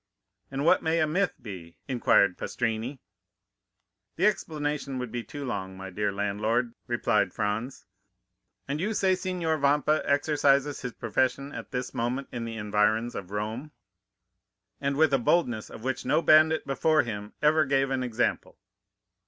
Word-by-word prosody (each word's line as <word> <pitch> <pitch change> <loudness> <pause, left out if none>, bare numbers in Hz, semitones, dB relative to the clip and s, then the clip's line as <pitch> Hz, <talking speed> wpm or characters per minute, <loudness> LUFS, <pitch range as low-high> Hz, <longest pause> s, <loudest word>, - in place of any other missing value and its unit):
"And 135 +2 -3
what - - +5
may 160 +1 +1
a 155 - +4
myth 180 +6 0
be?" 90 -8 -9
inquired 115 -7 +3
Pastrini. 115 +3 -3 1.2
"The - - +1
explanation 145 -3 -1
would 125 -3 -4
be 120 -1 -3
too 145 +2 -7
long, 95 -6 -4
my 95 0 -7
dear 105 +2 -1
landlord," 105 +4 -1
replied - - +1
Franz. 110 +6 -3 0.8
"And 140 +2 -2
you 210 +3 -1
say 190 -2 +2
that 185 - +2
Signor 175 -4 -1
Vampa 145 +2 +3
exercises 145 -1 +2
his 125 -2 -5
profession 130 +4 -1
at - - -7
this 125 -2 -4
moment 125 +4 -2
in 120 -1 -4
the 115 -1 -5
environs 105 +2 +1
of 95 -2 -6
Rome?" 110 +8 -4 1.1
"And 140 0 -1
with 155 -2 +4
a 135 - +4
boldness 120 -5 +1
of 110 - -10
which 130 0 -2
no 165 - +2
bandit 155 +1 +5
before 155 +3 +2
him 105 -3 -6
ever 155 +1 +5
gave 135 -1 +1
an 130 -1 0
example." 120 -1 -1
130 Hz, 155 wpm, -27 LUFS, 110-150 Hz, 1.2 s, what